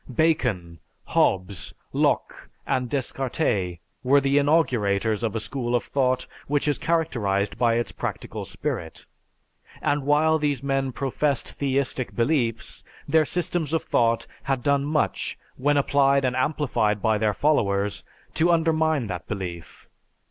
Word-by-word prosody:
Bacon, 115 - 0 0.3
Hobbes, 90 -2 0 0.2
Locke, - - 0 0.2
and 130 -2 -1
Descartes 120 - -1 0.2
were 140 +2 +4
the 140 +1 +2
inaugurators 115 -9 +2
of 115 -2 -2
a - - 0
school 120 +1 -2
of 120 - +1
thought 130 -2 0 0.2
which 145 +1 0
is 145 - +1
characterized 120 -12 0
by 120 -2 +3
its 120 0 -1
practical - - -5
spirit; 80 - -5 0.7
and 145 0 0
while 155 +3 +3
these 145 -3 -1
men 135 -1 0
professed 135 +1 -1
theistic 135 -2 -1
beliefs, 115 -3 0 0.2
their 155 +1 +4
systems 175 -2 -2
of 165 - +1
thought 115 -1 +1 0.2
had 135 -3 -2
done 140 -1 +2
much, 150 +1 -1 0.2
when 145 +2 +2
applied 140 -1 +3
and 125 -1 0
amplified 130 -6 +1
by 110 0 +1
their 105 -2 +1
followers, 100 -9 +1 0.3
to 170 +2 +3
undermine 160 -4 +2
that 90 -4 -6
belief. 90 -5 -6
130 Hz, 135 wpm, -25 LUFS, 110-145 Hz, 0.7 s, were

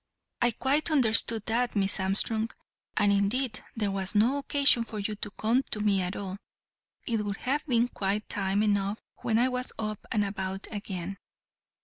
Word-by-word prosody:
"I 240 - +4
quite 270 +7 +1
understood 225 -6 +5
that, 235 +1 0
Miss 195 0 +1
Armstrong, 215 +4 0 0.5
and 205 -1 +4
indeed 215 +4 0
there 210 -3 -1
was 195 +1 -3
no 240 +7 +3
occasion 280 -4 +4
for 220 -1 -8
you 210 +1 -2
to 210 - -4
come 225 +5 +1
to 215 - -1
me 205 -2 +2
at 180 +1 -3
all. 195 -1 -5 0.7
It 225 -3 -1
would 200 -1 -4
have 280 +4 -1
been 240 -2 +2
quite 205 -2 -2
time 195 +1 0
enough 205 0 0 0.2
when 220 - 0
I 245 +2 +3
was 250 0 0
up 215 -1 -4
and 210 -2 +1
about 195 -1 -4
again. 195 -3 -5
215 Hz, 170 wpm, -28 LUFS, 200-235 Hz, 0.7 s, understood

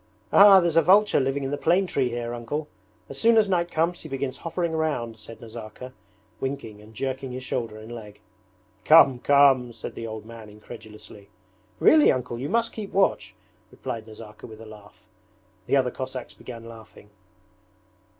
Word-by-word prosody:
'Ah, 200 -1 +9
there's 170 -3 0
a 165 - +6
vulture 205 +4 +4
living 135 +1 -1
in 135 - -3
the 145 - -3
plane 180 +6 +2
tree 135 -8 -1
here, 120 0 -4
Uncle. 135 +6 -5 0.4
As 140 - -8
soon 230 0 +4
as 215 -2 +4
night 175 -2 0
comes 170 +2 -1
he 155 - -10
begins 135 -1 -4
hovering 170 0 -3
round,' 135 -9 -2
said 115 +1 -12
Nazarka, 115 +2 -10 0.5
winking 130 -6 -5
and 110 +1 -17
jerking 130 +1 -4
his 130 +1 -6
shoulder 115 -4 -4
and 110 +2 -11
leg. 105 -3 -11 0.6
'Come, 145 -5 +6
come!' 135 -3 +4
said - - -8
the 115 - -7
old 110 -1 -8
man 115 -1 -11
incredulously. 105 -1 -13 0.5
'Really, 305 -1 +6
Uncle! 125 -2 -4
You 135 - -4
must 230 +2 0
keep 210 -3 -7
watch,' 195 0 0 0.3
replied 115 -4 -7
Nazarka 110 -1 -12
with 110 -2 -12
a 115 - -11
laugh. 105 -1 -15 0.6
The - - +2
other 130 -2 +2
Cossacks 130 -2 -7
began 115 -2 -11
laughing. 110 -2 -14
130 Hz, 170 wpm, -25 LUFS, 115-155 Hz, 0.6 s, Ah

